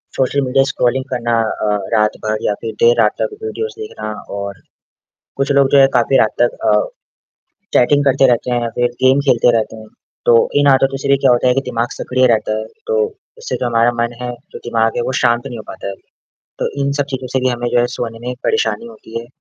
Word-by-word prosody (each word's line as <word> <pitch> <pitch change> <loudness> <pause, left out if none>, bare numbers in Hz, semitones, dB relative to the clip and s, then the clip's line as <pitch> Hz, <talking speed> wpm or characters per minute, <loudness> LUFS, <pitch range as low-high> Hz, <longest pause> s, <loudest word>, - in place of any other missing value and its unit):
Social 135 +2 +1
media 135 0 +2
scrolling 130 +2 0
करना 120 -2 0 0.2
अ, 105 - +1 0.2
रात 105 -1 +2
भर 110 0 0
या 105 - +2
फिर 110 -1 -4
देर 120 0 +6
रात 105 - +4
तक - - -1
वीडियोज़ 445 +1 -4
देखना। 265 - -6 0.3
और 100 0 -6 0.8
कुछ 140 +1 0
लोग 140 -1 +4
जो 140 - +6
है 135 - +7
काफ़ी - - +3
रात - - +2
तक - - +2
अ, - - +4 1.0
चैटिंग 145 +3 +3
करते 135 -1 +4
रहते 125 0 +1
हैं 120 -1 +1
या 115 - -1
फिर 120 - +3
गेम 130 +2 +5
खेलते 120 0 +4
रहते 110 0 -2
हैं। 110 0 -11 0.4
तो - - +6 0.3
इन 145 - +2
आदतों 135 0 +3
से 140 - -2
भी 140 - +5
क्या 135 -1 +3
होता 120 +1 +3
है 125 - +3
कि 135 - +2
दिमाग 120 0 -1
सक्रिय 130 0 +1
रहता 110 -2 +1
है, - - -4 0.2
तो 460 0 0 0.4
इससे 470 +1 -4
जो 125 - -2
हमारा 115 0 +3
मन 120 0 -2
है, 125 - -3 0.2
जो - - -7
दिमाग 115 -1 0
है 120 - 0
वो 130 - -2
शांत 120 +1 +2
नहीं 120 -4 -6
हो - - -7
पाता - - -7
है, 100 - -5 0.6
तो - - -1
इन 140 0 0
सब - - +2
चीज़ों 130 -1 -4
से 130 - +1
भी 130 - +1
हमें 120 -1 -2
जो 120 - +2
है 120 - +2
सोने 115 -1 -4
में 120 - -10
ही - - -2
एक 125 - -11
परेशानी 445 - 0
होती 115 - -8
है। 115 - -11
125 Hz, 240 wpm, -17 LUFS, 115-135 Hz, 1.0 s, है